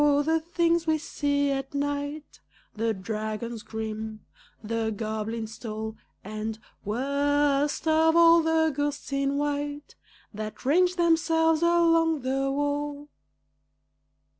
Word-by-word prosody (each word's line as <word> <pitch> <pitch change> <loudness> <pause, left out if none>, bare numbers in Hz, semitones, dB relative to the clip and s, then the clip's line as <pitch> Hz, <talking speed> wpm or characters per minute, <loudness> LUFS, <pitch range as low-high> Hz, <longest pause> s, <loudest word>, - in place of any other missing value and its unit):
the 295 +2 +3
things 335 0 +1
we 315 0 +3
see 285 -2 0
at 270 0 -3
night 285 +1 -3 0.4
The 225 +1 0
dragons 215 +3 -4
grim, 220 0 -6 0.4
the 225 +1 -1
goblins 220 +1 -4
tall, 220 -1 -5 0.3
And, 215 +2 -4 0.3
worst 280 +6 +1
of 320 +1 +4
all, 335 0 +7
the 320 -1 +2
ghosts 290 0 -3
in 275 0 0
white 290 0 -3 0.4
That 215 +2 -7
range 355 +6 +3
themselves 325 -2 +3
along 330 -2 +3
the 270 +1 0
wall! 290 +1 -2
285 Hz, 110 wpm, -27 LUFS, 225-315 Hz, 0.4 s, all